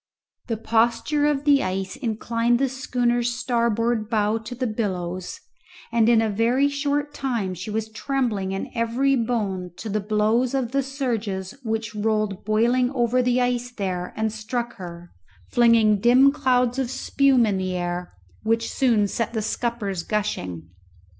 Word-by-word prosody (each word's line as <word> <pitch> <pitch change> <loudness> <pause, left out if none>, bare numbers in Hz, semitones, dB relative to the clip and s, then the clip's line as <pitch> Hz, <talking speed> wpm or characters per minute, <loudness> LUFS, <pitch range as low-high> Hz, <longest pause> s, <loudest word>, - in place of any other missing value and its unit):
The 225 -2 -2
posture 230 +6 +1
of 290 -2 0
the 285 -2 +4
ice 190 +1 -3
inclined 230 0 0
the 270 +1 +1
schooner's 245 -2 0
starboard 235 -2 0
bow 215 -1 +1
to 225 +3 -8
the 255 +1 -2
billows; 185 -5 -3 0.5
and 230 -1 +3
in 225 -1 +5
a 220 - 0
very 240 +7 +2
short 285 +1 -1
time 235 -9 -2
she 185 +4 -7
was 220 +1 -2
trembling 220 -6 -1
in 195 - -4
every 245 +4 +1
bone 210 -7 -1
to 215 +5 -6
the 210 +1 0
blows 215 +5 +1
of 250 -3 -1
the 275 +1 +2
surges 230 -8 -3
which 220 -2 -3
rolled 215 -2 -1
boiling 235 +4 +2
over 245 0 +2
the 250 0 +2
ice 245 0 0
there 185 -4 -3
and 220 -1 0
struck 235 +2 -4
her, 175 -2 -9 0.4
flinging 230 -3 +4
dim 250 +5 +6
clouds 250 -3 +1
of 260 -3 -1
spume 265 -1 +3
in 205 -3 0
the 185 -1 -2
air, 175 0 -3 0.3
which 230 +1 0
soon 230 -6 +2
set 230 +2 -2
the 220 - -1
scuppers 220 -5 -2
gushing. 90 - -3
230 Hz, 155 wpm, -24 LUFS, 210-250 Hz, 0.5 s, dim